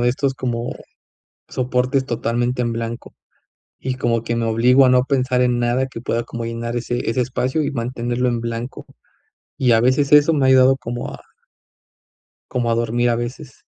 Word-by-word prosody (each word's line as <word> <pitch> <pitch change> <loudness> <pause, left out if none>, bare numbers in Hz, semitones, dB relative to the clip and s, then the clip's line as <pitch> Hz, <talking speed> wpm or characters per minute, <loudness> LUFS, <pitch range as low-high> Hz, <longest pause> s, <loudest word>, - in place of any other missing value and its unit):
de 120 - +3
estos 135 +2 0
como 120 -2 -3 0.8
soportes, 130 +1 0
totalmente 120 +1 -1
en 120 -1 -1
blanco, 115 +1 -5 0.7
y 130 -1 -3
como 115 -2 0
que 115 0 -2
me 115 - -1
obligo 125 +4 +4
a - - +4
no 125 0 +4
pensar 130 -2 +1
en 125 -1 +1
nada 120 +2 +1
que 120 -3 -8
pueda 115 0 -1
como 115 0 -6
llenar 115 +1 -4
ese 120 -1 -2
ese 125 - 0
espacio 130 +4 -1
y - - -2
mantenerlo 120 0 -2
en 120 -1 -1
blanco, 115 +2 -5 0.7
y 125 -3 +3
a 115 - +5
veces 130 +4 +2
eso 150 +2 +6
me 140 - +1
ha 130 - +4
ayudado 130 0 +6
como 120 -1 -5
a - - -12 1.3
como 120 -2 -1
a - - +2
dormir, 120 +1 0
a 115 - +1
veces. 125 +4 -7
120 Hz, 185 wpm, -20 LUFS, 115-130 Hz, 1.3 s, eso